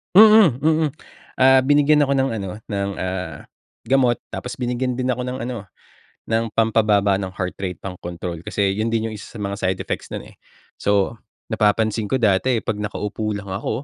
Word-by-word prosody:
Mm, 215 -1 +9
mm, 155 +1 +2 0.5
ah, 130 0 +6
binigyan 145 +2 +4
ako 140 - 0
ng 135 -1 +2
ano 95 -3 -4 0.2
ng, 100 -1 -2
ah, 95 -2 -4 0.4
gamot 130 -2 +3
tapos 125 +1 -7
binigyan 125 +1 -1
din 125 - 0
ako 125 0 -1
ng 125 +1 -4
ano 120 -5 -5 0.6
ng 115 0 0
pampababa 105 -3 +3
ng 95 -1 -3
heart 90 -1 -4
rate, 90 -3 -4
pangkontrol. 85 -2 -6
Kasi 100 -1 0
yun 110 +2 -1
din 115 -1 0
yung 110 - -7
isa - - -10
sa - - -8
mga 100 -1 -3
side 95 0 0
effects - - -4
nun, - - -5
eh. - - -17 0.4
So, 100 +2 +1 0.3
napapansin 110 -1 +1
ko 130 - +2
dati 115 +2 +2
pag - - -1
nakaupo 105 +1 -3
lang 100 -1 -5
ako, 95 +2 -3
110 Hz, 180 wpm, -21 LUFS, 100-130 Hz, 0.6 s, Mm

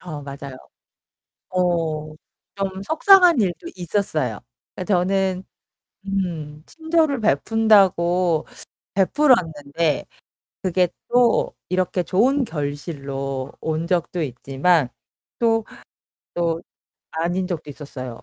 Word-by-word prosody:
어 155 -5 -7
맞아요. 140 -1 -8 0.9
어. 165 -4 0 0.4
좀 195 -1 -3
속상한 355 - +6
일도 190 - -1
있었어요. 160 - -1 0.4
그러니까 185 +2 -1
저는 190 +1 +1 0.6
음 165 -6 -3
친절을 320 -4 0
베푼다고 180 -3 +3 0.5
베풀었는데 165 - +2 0.6
그게 185 -1 +2 0.2
또 245 -1 +3
이렇게 185 0 0
좋은 255 - +2
결실로 140 - -4
온 160 +1 -2
적도 175 -1 0
있지만 140 +3 +1 0.5
또, 225 -1 +2 0.7
또 170 -1 -1 0.5
아닌 175 +3 -1
적도 170 -5 -5
있었어요. 130 -4 -8
175 Hz, 200 characters per minute, -22 LUFS, 150-195 Hz, 0.9 s, 속상한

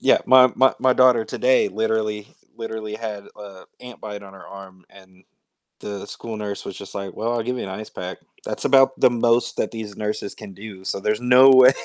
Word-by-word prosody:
yeah, - - +4
my 130 -1 +6
my 130 0 +4
my 130 -1 +3
daughter 125 -3 +4
today 130 -3 +1
literally 110 0 -2 0.2
literally 110 -2 -6
had 110 -2 -6
a 100 -3 -12 0.2
ant 125 -1 -12
bite 105 -1 -7
on 95 -1 -13
her 95 - -14
arm, 95 -2 -13
and 95 -1 -20 0.6
the 100 -1 -7
school 115 0 -8
nurse 105 -1 -5
was, 95 - -8
just, 100 - -11
like, 100 -2 -5
"Well, 115 +2 -2
I'll 115 -2 -1
give 125 +1 -3
you - - -4
an - - -6
ice 105 +3 -7
pack," 90 0 -7 0.3
that's - - -5
about 135 0 +4
the - - +5
most 120 0 +1
that - - -1
these 110 -3 -8
nurses 105 -1 -4
can 95 - -11
do, 95 -1 -11
so 100 - -3
there's 105 +2 -1
no 125 +2 +7
way 130 0 +7
110 Hz, 215 wpm, -22 LUFS, 100-120 Hz, 0.6 s, no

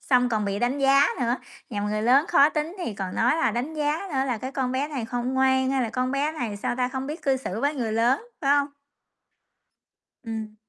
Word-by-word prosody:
Xong 250 -2 +3
còn 215 -3 0
bị 200 0 -2
đánh 245 +5 0
giá 275 +1 +5
nữa, 240 0 +1 0.3
nhằm 205 -2 -2
người 215 +1 -1
lớn 265 +7 +4
khó 310 -5 +5
tính 310 +3 -3
thì 340 - -4
còn 190 -2 -5
nói 245 +6 +2
là 325 - +2
đánh 245 +8 -3
giá 300 +1 0
nữa 265 -1 +1
là 245 -4 -1
"Cái 260 +4 -6
con 260 -2 -1
bé 270 +3 -1
này 275 -6 -4
không 245 +3 -3
ngoan, 265 0 +3
hay 270 -1 +1
là 230 - -2
con 255 +2 -1
bé 285 +3 0
này, 240 -9 -4
sao 205 - -2
ta, 250 -1 +1
không 265 +1 -4
biết 300 +4 -6
cư 270 -2 +2
xử 225 -4 -5
với 290 +2 +1
người 230 -5 -2
lớn", 240 - +2 0.2
phải 280 +1 +4
hông? 285 - +1 1.6
Ừm. 220 -2 -5
260 Hz, 235 wpm, -25 LUFS, 230-280 Hz, 1.6 s, giá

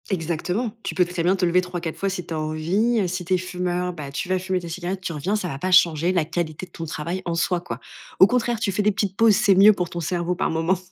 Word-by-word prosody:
Exactement. 180 +5 -2
Tu - - -4
peux 180 - +4
très 175 -1 -3
bien 180 +3 +3
te 185 - +1
lever 180 +1 +3
3-4 175 -3 -5
fois 195 - -1
si 185 -2 -4
tu 170 - -6
as 155 - -2
envie. 185 +8 0
Si 180 +1 -3
tu 180 +2 -1
es - - +2
fumeur, 180 0 -2
bah, 150 -4 -7
tu 150 - -4
vas 185 0 +1
fumer 185 0 -1
tes 175 - -8
cigarettes, 185 +3 -4
tu 185 -3 -4
reviens, 170 +8 -1
ça 210 -4 -2
va 135 -5 -5
pas 185 +5 -2
changer 170 -1 +4
la 175 -4 +1
qualité 165 +1 -3
de 175 - -27
ton 165 - -6
travail 170 +4 -4
en 170 -1 -1
soi, 170 +1 0
quoi. - - -6 0.4
Au 190 - +9
contraire, 240 -1 0
tu 205 - 0
fais 195 - 0
des 210 +1 +3
petites 195 -1 -2
pauses, 225 -1 +5
c'est 195 0 +4
mieux 205 +3 +8
pour 180 -3 -3
ton 175 - -5
cerveau, 175 +1 -1
par 190 - 0
moment. 165 +3 +1
180 Hz, 280 wpm, -23 LUFS, 170-190 Hz, 0.4 s, Au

